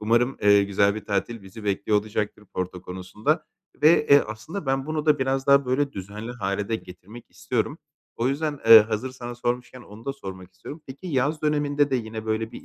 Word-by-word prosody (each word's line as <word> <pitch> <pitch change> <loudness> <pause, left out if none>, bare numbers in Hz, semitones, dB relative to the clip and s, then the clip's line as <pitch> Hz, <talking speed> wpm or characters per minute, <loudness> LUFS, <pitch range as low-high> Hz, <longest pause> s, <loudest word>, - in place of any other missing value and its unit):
Umarım, 120 +4 +2
eee, 100 -1 +6
güzel 100 0 +2
bir 110 - -7
tatil 105 +2 -2
bizi 100 +3 -11
bekliyor 100 +1 +1
olacaktır 105 0 -4
Porto 90 -1 -4
konusunda 95 - -2 0.4
ve, 155 0 +5
eee, 140 0 +7
aslında 135 - -7
ben 135 +1 0
bunu 155 0 -3
da 150 -2 +4
biraz 135 0 -1
daha 140 0 +5
böyle 140 +2 0
düzenli 105 +5 -7
hâle 100 -3 -3
de 115 - 0
getirmek 100 +5 -13
istiyorum. - - -2 0.4
O 120 +2 +1
yüzden, 145 +1 -2
eee, 115 -1 +11
hazır 110 +4 -2
sana 120 -1 -8
sormuşken 125 +1 -3
onu 110 0 -13
da 140 - -2
sormak 95 -7 -9
istiyorum. 145 - -10
Peki, 140 +8 -10
yaz 150 +1 0
döneminde 145 -1 +1
de 130 - +2
yine 110 -2 -6
böyle 110 +1 -2
bir - - -10
115 Hz, 195 wpm, -25 LUFS, 105-140 Hz, 0.4 s, eee